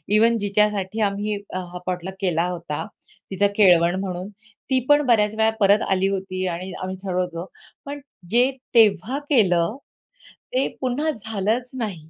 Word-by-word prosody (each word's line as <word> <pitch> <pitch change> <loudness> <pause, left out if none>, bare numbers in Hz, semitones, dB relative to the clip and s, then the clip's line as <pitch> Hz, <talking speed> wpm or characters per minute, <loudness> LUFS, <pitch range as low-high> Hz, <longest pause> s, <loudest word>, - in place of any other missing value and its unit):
Even 230 +2 +4
जिच्यासाठी 210 0 +1
आम्ही 205 +1 -2 0.2
हा 180 -1 -5
potluck 185 +1 -3
केला 175 -3 +1
होता 170 -1 -4 0.5
तिचा 200 +2 +2
केळवण 180 -3 +5
म्हणून, 185 0 -4 0.4
ती 260 -1 +3
पण 290 0 +6
बऱ्याच 215 -3 +3
वेळा 220 0 +4
परत 200 0 +5
आली 190 0 +2
होती 185 -1 -3
आणि 180 +2 -4
आम्ही 185 0 -4
ठरवतो, 180 -2 -3 0.4
पण 285 +1 -6 0.3
जे 245 +3 +4 0.2
तेव्हा 225 +4 +4
केलं 190 - +3 0.8
ते 260 +2 +2
पुन्हा 275 +5 0
झालंच 220 +1 -2
नाही. 185 -10 -5
200 Hz, 140 wpm, -23 LUFS, 185-225 Hz, 0.8 s, पण